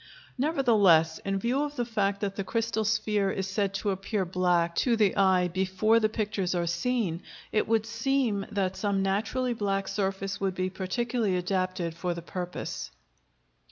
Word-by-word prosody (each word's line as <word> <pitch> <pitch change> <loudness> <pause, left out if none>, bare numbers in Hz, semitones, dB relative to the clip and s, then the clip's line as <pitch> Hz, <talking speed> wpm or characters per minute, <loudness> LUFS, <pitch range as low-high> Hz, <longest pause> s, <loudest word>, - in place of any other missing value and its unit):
Nevertheless, 215 - +3
in 195 0 -2
view 240 +7 0
of 295 0 -3
the 240 - -1
fact 200 -3 0
that 200 -2 -2
the 195 - -2
crystal 225 +2 -1
sphere 215 -2 +1
is 190 0 -2
said 195 0 -1
to 200 +1 0
appear 195 +1 -2
black 175 -1 +1
to 240 -3 +3
the 210 -4 +2
eye 190 -2 +4
before 190 +5 +2
the 215 -1 +2
pictures 210 -4 -1
are 175 -1 0
seen, 175 0 -1 0.3
it 215 - +1
would 225 -1 +2
seem 230 -2 0
that 190 -2 -1
some 200 -2 0
naturally 230 +6 0
black 195 -3 -1
surface 195 0 -2
would 190 -2 0
be 185 0 -1
particularly 210 +2 -1
adapted 185 -2 -1
for 170 +1 -3
the 170 - -7
purpose. 180 0 -5
195 Hz, 165 wpm, -28 LUFS, 185-225 Hz, 0.3 s, eye